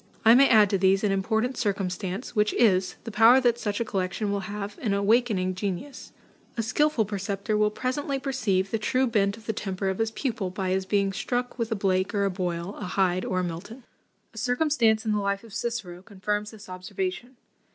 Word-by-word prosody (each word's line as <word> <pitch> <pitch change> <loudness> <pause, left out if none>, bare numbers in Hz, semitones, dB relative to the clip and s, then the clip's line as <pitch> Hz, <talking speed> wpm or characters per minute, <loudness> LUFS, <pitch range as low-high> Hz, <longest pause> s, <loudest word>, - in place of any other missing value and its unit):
I 225 - +9
may 270 +3 +6
add 215 -4 +6
to 195 - +1
these, 190 +1 +3
an 205 - +2
important 220 +6 0
circumstance, 195 +1 -3
which 210 0 +2
is, 190 -5 +3
the 225 - -6
power 225 +4 +7
that 240 -2 +2
such 205 -3 -2
a 235 - 0
collection 195 +1 -2
will 200 - 0
have 205 0 -6
in 210 -5 0
awakening 200 -2 +2
genius. 200 +8 -5 0.5
A 230 - 0
skilful 295 +1 +1
preceptor 200 +1 -3
will 210 0 +3
presently 260 +5 -2
perceive 225 -9 -1
the 225 - 0
true 255 +4 +1
bent 205 -3 +1
of 220 - -16
the 220 - -1
temper 195 -2 -3
of 190 - -3
his 225 0 +1
pupil, 225 -5 -3
by 185 0 -3
his 190 0 -1
being 200 -1 +1
struck 245 +3 -3
with 230 0 -2
a - - +1
Blake 190 +1 0
or 200 -1 +2
a 195 - 0
Boyle, 180 0 -3
a - - -5
Hyde 185 -1 +1
or 185 -1 0
a - - -2
Milton." 180 +9 -6 0.5
A 225 - -7
circumstance 245 -3 +2
in 220 - +1
the 210 - +1
life 200 0 -1
of 225 -3 -14
Cicero 220 -7 -4
confirms 205 +1 -3
this 215 -2 -13
observation. 245 - -5
210 Hz, 205 wpm, -26 LUFS, 190-235 Hz, 0.5 s, I